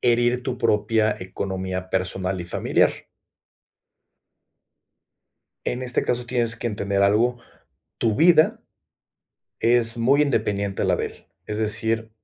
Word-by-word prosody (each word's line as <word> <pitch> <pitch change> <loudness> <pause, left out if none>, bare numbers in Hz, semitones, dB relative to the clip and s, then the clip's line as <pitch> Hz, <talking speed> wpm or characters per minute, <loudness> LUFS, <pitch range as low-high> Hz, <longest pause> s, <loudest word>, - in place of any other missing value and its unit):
herir 120 +1 +2
tu 130 -1 -3
propia 110 -2 +2
economía 95 0 -4
personal 95 0 -1
y - - -5
familiar. 85 - 0 2.6
En 125 +1 -1
este 125 -1 +1
caso 125 0 -1
tienes 120 -2 +1
que 120 - -4
entender 100 -3 -1
algo, 115 +5 +2 0.6
tu 110 -2 +1
vida 160 -1 +5 1.0
es 115 0 +2
muy 135 +5 +3
independiente 105 -7 -1
a - - +1
la - - +2
de - - -2
él, - - -13 0.2
es 105 - -5
decir, 110 +1 -1
115 Hz, 125 wpm, -23 LUFS, 100-120 Hz, 2.6 s, vida